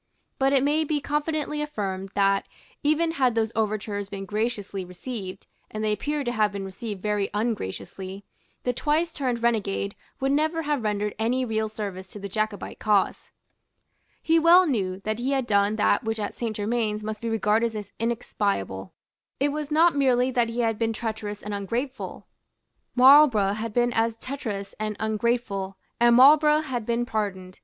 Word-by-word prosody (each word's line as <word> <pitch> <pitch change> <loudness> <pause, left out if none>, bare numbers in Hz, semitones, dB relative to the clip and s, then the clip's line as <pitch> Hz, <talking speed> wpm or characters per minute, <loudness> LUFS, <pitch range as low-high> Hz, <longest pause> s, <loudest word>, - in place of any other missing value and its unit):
But 270 0 +3
it 270 -1 +3
may 300 +3 +2
be 305 -1 0
confidently 300 +1 -2
affirmed 195 -10 -3
that, 195 0 +2 0.3
even 310 +3 +2
had 260 -7 +1
those 225 -1 +1
overtures 210 -2 -2
been 195 -1 -6
graciously 210 -2 -2
received, 185 +2 -7 0.2
and 215 0 -4
they 215 - +1
appear 290 +7 -2
to 240 - -1
have 215 -3 +2
been 200 -1 -5
received 200 0 -6
very 210 -2 0
ungraciously, 195 - -4 0.4
the 250 - 0
twice 315 +5 0
turned 250 -5 -2
renegade 200 -4 0 0.2
would 270 0 +1
never 315 +3 +1
have 295 -3 0
rendered 210 -1 -1
any 250 +3 +1
real 220 -2 -1
service 200 -3 -6
to 205 - -10
the 200 - -5
Jacobite 215 +1 -3
cause. 210 -3 +1 0.9
He 325 0 +4
well 345 +3 +7
knew 195 - -1
that 215 +2 -2
he 260 +3 0
had 265 -2 0
done 200 -1 +2
that 215 - +2
which 225 0 -2
at 205 - -3
Saint 230 -2 -3
Germains 215 0 -1
must 215 0 -5
be 230 - -2
regarded 225 +1 +1
as 210 -1 -6
inexpiable. 200 - -2 0.5
It 285 +2 +2
was 295 0 -4
not 320 +1 +4
merely 260 -2 +3
that 240 -2 +1
he 235 +1 -1
had 225 -2 0
been 225 -1 +1
treacherous 220 -2 -4
and 210 - -5
ungrateful. 235 +7 -4 0.7
Marlborough 255 -6 +7
had 220 +1 -4
been 240 +2 +1
as 225 0 +1
treacherous 225 -7 -5
and 215 0 -2
ungrateful; 220 -3 -1 0.2
and 240 0 +6
Marlborough 300 +4 +7
had 250 -7 -4
been 235 +1 0
pardoned. 195 -6 -4
225 Hz, 170 wpm, -25 LUFS, 205-265 Hz, 0.9 s, well